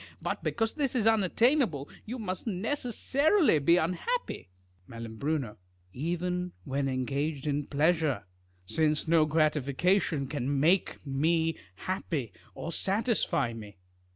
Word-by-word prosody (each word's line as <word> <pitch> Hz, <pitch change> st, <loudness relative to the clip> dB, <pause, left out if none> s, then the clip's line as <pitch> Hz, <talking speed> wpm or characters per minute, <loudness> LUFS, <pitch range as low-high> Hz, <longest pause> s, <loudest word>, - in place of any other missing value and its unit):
Eut -, -, -2 dB
because 225 Hz, -1 st, -1 dB
this 280 Hz, -4 st, -1 dB
is 225 Hz, -4 st, +2 dB
unattainable, 225 Hz, -, +3 dB, 0.2 s
you 245 Hz, +4 st, -4 dB
must 190 Hz, -2 st, -4 dB
necessarily 265 Hz, -, +2 dB
be 170 Hz, +5 st, +4 dB
unhappy. 185 Hz, -, -2 dB, 0.4 s
3Ial. 115 Hz, +2 st, -3 dB, 0.4 s
Even 180 Hz, +4 st, -2 dB
when 135 Hz, -1 st, -1 dB
engaged 140 Hz, +3 st, -2 dB
in 145 Hz, -1 st, -1 dB
pleasure; 155 Hz, -, +1 dB, 0.4 s
since 155 Hz, -, +1 dB
no 160 Hz, -1 st, +4 dB
grati 155 Hz, -1 st, +2 dB
fication 150 Hz, +1 st, +1 dB
can 140 Hz, 0 st, -1 dB
make 170 Hz, +4 st, +2 dB
me 160 Hz, +4 st, +1 dB, 0.2 s
happy, 145 Hz, -, -3 dB, 0.2 s
or 165 Hz, -, -5 dB
satisfy 200 Hz, -, 0 dB
me. 105 Hz, -4 st, -10 dB
160 Hz, 115 wpm, -29 LUFS, 140-195 Hz, 0.4 s, be